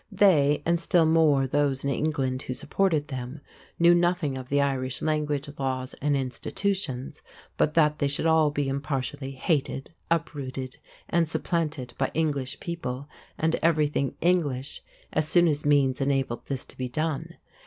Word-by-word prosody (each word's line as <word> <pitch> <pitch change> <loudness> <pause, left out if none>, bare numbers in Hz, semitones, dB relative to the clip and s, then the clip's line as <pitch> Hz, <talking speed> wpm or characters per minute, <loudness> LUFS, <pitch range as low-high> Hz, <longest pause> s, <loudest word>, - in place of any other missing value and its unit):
They, 160 -8 +4
and 170 0 +2
still 175 -2 +3
more 155 -4 +4
those 140 0 0
in 140 - 0
England 135 -2 -1
who 130 - -5
supported 160 -5 0
them, 130 +1 -5 0.4
knew 170 +1 +6
nothing 175 -4 +1
of 130 -1 -7
the 145 - +2
Irish 135 -2 0
language, 150 -2 -1
laws, 130 -1 -2
and 145 0 +2
institutions 140 +1 -3 0.3
but 155 - +1
that 150 -2 +3
they 140 - +2
should 140 +3 -2
all 160 -2 +4
be 145 -1 -1
impartially 135 0 -3
hated, 135 +1 -1 0.2
uprooted, 135 -6 -2 0.3
and 165 -2 +1
supplanted 155 -8 -2
by 135 - +1
English 145 -5 -1
people 145 -6 -5 0.3
and 160 +1 +1
everything 150 -4 +1
English 150 -7 0 0.3
as 155 0 +1
soon 175 +2 +5
as 150 -2 0
means 140 -3 +3
enabled 135 -3 -1
this 135 -2 -3
to - - -12
be 130 -1 -2
done. 155 +2 -2
145 Hz, 155 wpm, -27 LUFS, 135-160 Hz, 0.4 s, knew